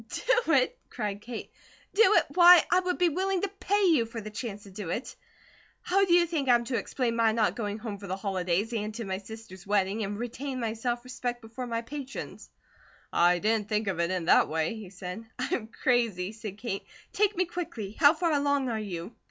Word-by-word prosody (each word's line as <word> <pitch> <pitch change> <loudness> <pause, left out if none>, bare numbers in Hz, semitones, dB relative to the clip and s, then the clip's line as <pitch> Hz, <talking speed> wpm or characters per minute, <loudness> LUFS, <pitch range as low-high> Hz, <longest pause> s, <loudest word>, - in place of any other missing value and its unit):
"Do - - +1
it?" - - +2
cried 205 -3 -4
Kate. 235 0 -7 0.4
"Do 425 - +3
it! - - +6
Why, 355 -1 +9
I 360 - +5
would 365 -1 -1
be 355 -1 +3
willing 375 +3 -1
to - - +2
pay 410 +1 +1
you 310 -11 +4
for 230 0 -6
the 215 -1 -7
chance 210 -2 -6
to 200 - -13
do 190 -2 -6
it. 225 +9 -4 0.7
How 390 +2 +3
do 350 - +2
you 350 -1 +5
think 310 -6 -2
I'm 240 -1 +5
to 240 0 -2
explain 240 -2 -1
my 225 -1 +3
not 220 -1 +1
going 210 -3 -3
home 215 -3 -6
for 200 - -9
the 190 - -2
Holidays, 190 +2 -1
and 215 -1 -3
to 230 -1 -5
my 190 -1 -3
sister's 205 -2 -11
wedding, 205 +1 +1
and 205 0 -3
retain 255 +3 -4
my 225 -2 -1
self 240 +1 -2
respect 250 -1 -4
before 240 +2 -7
my 230 0 -2
patrons?" 275 +2 -7 0.6
"I 175 +1 +4
didn't 210 +2 0
think 215 0 0
of 185 -4 -1
it 170 0 +1
in 185 -2 -2
that - - +5
way," 160 +3 -1
he 215 -4 -8
said. 185 +2 -7
"I'm 220 - -2
crazy," 225 -6 0
said 215 -3 -8
Kate. 210 -4 -4 0.3
"Take 410 -3 +2
me 370 - +2
quickly! 330 - -5
How 285 +7 +5
far 335 0 0
along 285 -2 +1
are 225 -2 -1
you?" 195 0 -6
230 Hz, 215 wpm, -28 LUFS, 205-280 Hz, 0.7 s, Why